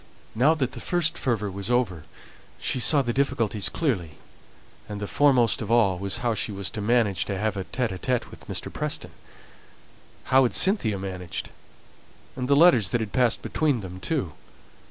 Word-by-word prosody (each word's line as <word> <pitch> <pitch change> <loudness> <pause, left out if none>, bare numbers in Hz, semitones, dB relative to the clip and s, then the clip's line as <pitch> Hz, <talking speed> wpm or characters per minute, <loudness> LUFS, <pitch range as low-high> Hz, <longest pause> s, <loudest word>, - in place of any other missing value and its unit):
Now 140 +8 +4
that 135 -5 -1
the - - -8
first 170 -2 +1
fervour 105 -6 -1
was 100 +3 -5
over, 110 -11 0 0.5
she - - -1
saw 140 +3 +4
the 120 -1 -2
difficulties 115 -7 0
clearly; 95 - -2 0.7
and 105 -1 -5
the 105 - -3
foremost 125 -2 +3
of 110 - -5
all 105 -6 +3
was 100 +3 -1
how 120 - +2
she 110 - -2
was 100 -2 -3
to 110 - -5
manage 105 -4 +2
to 100 - -3
have 105 0 -1
an 95 -2 -5
interview 125 0 -1
with - - -14
Mr. - - -5
Preston. - - -4 1.1
How 130 +1 +4
had 125 - +1
Cynthia 175 - +2
managed? 90 -3 -5 0.8
and 125 -1 -3
the 140 - +4
letters 140 - +5
that 120 - 0
had 110 -2 -5
passed 125 -3 +2
between 145 -7 0
them 95 -1 -8
too? 100 - -2
115 Hz, 175 wpm, -25 LUFS, 100-130 Hz, 1.1 s, letters